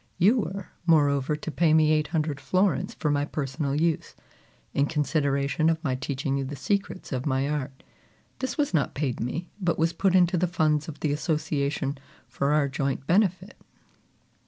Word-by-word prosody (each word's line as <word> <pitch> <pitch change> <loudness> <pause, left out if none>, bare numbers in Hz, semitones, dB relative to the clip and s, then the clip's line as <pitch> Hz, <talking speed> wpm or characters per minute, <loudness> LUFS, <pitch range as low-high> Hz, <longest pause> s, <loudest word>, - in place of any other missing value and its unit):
You 215 +8 +4
were, 195 0 -4 0.2
moreover, 145 -3 +3
to 155 +1 -6
pay 160 0 +3
me 155 -1 +4
eight 155 -1 +2
hundred 155 -4 -1
florins 185 +8 +1
for 150 -4 0
my 145 0 +1
personal 145 0 -2
use, 165 -1 0 0.6
in 140 +1 +2
consideration 145 -1 +1
of 165 0 -1
my 135 -5 0
teaching 135 +1 -2
you - - -1
the 140 +2 -5
secrets 195 +6 -2
of 130 +1 -2
my 135 0 +1
art. 140 -3 -4 0.6
This 260 - -3
was 290 -8 0
not 155 -4 +1
paid 135 -4 -2
me, 145 +9 -3
but 175 -2 +1
was 165 +1 +1
put 190 +2 +2
into 180 -1 +4
the 180 - +2
funds 155 -4 +1
of 160 - -8
the 145 -2 +1
association 145 -2 -1 0.3
for 140 +1 -1
our 150 -1 +3
joint 135 0 -2
benefit." 190 +2 +1
150 Hz, 175 wpm, -26 LUFS, 140-170 Hz, 0.6 s, You